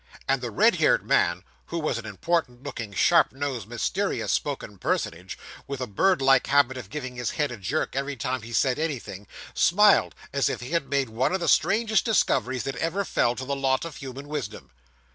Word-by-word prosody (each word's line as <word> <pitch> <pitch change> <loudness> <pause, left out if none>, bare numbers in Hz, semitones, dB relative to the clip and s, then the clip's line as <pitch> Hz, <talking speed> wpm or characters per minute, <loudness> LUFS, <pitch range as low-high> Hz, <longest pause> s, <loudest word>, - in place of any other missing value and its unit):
And 135 -1 +1
the 120 - -3
red 105 - +3
haired - - +3
man, 85 +2 +2 0.2
who 170 - -4
was 155 -7 -1
an 110 - -8
important 125 - -2
looking, 115 -7 -6
sharp 165 - +4
nosed, 130 -6 -4
mysterious 185 - -1
spoken 130 -9 -3
personage, 90 +2 -2 0.3
with 140 -1 -5
a 130 - -2
bird 155 - +1
like 135 -1 +4
habit 140 -2 +3
of 120 -7 -8
giving 130 -1 -6
his 125 -2 -2
head 145 -4 0
a 120 - -6
jerk 110 +12 -2
every 140 +1 -2
time 130 0 -3
he 115 +2 -10
said 130 +4 +1
anything, 125 - -4 0.3
smiled 205 +4 +4 0.2
as 140 -2 +2
if - - -3
he 125 +3 -8
had 170 -5 -1
made 140 -3 0
one 120 +9 0
of - - -1
the 170 - -2
strangest 220 +5 +3
discoveries 130 - +1
that 135 -2 -4
ever 175 +7 -1
fell 120 -8 +1
to 130 - -5
the 140 +1 -2
lot 135 +1 0
of 165 -4 -8
human 135 +1 -8
wisdom. 145 -8 -6
135 Hz, 200 wpm, -26 LUFS, 120-155 Hz, 0.3 s, sharp